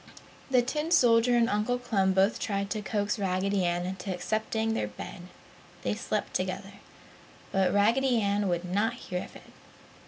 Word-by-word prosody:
The 250 -2 +4
tin 300 +5 -2
soldier 240 -6 +5
and 230 -1 +4
Uncle 215 +4 0
Clem 200 -6 +1
both 195 +3 +3
tried 200 -1 -2
to 215 - -1
coax 205 +1 -1
Raggedy 195 0 0
Ann 175 0 0
into 190 +1 -4
accepting 220 +4 -1
their - - -1
bed 180 -2 -9 0.6
(they - - 0
slept - - -3
together), 190 +2 -3 0.8
but 190 -2 +2
Raggedy 235 +5 +3
Ann 200 -1 +1
would 175 0 -1
not 205 +6 0
hear 180 -6 -5
of - - -13
it. - - -15
205 Hz, 160 wpm, -28 LUFS, 190-230 Hz, 0.8 s, soldier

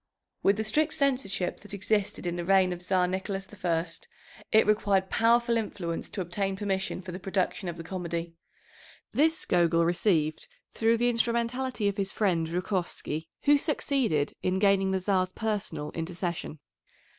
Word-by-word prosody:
With 200 +1 +3
the 220 - 0
strict 300 +8 +1
censorship 255 - 0
that 205 0 -8
existed 205 -1 -1
in 175 0 -1
the 175 - -3
reign 190 0 +4
of 175 - -7
Czar 180 0 +2
Nicholas 190 +1 -3 0.2
I, 165 -1 +1 0.7
it 220 - +6
required 200 -3 +2
powerful 235 +1 +3
influence 175 -6 -3
to 195 - -4
obtain 195 +2 -2
permission 195 -2 -2
for 180 - -7
the 180 - -6
production 185 0 -1
of 170 - -6
the 165 - -6
comedy. 170 -1 -4 0.8
This 320 +3 +2
Gogol 170 -1 +3
received 170 - +1 0.3
through 230 +1 +3
the 240 +1 +2
instrumentality 235 0 0
of 200 0 -1
his 195 -1 -1
friend, 175 -6 +1
Zhukovsky, 175 -3 -2 0.2
who 290 0 +5
succeeded 260 - 0
in 185 +1 0
gaining 195 -1 +3
the 190 0 +1
Czar's 185 -1 +1
personal 200 -9 -3
intercession. 170 -1 -4
190 Hz, 155 wpm, -28 LUFS, 175-220 Hz, 0.8 s, it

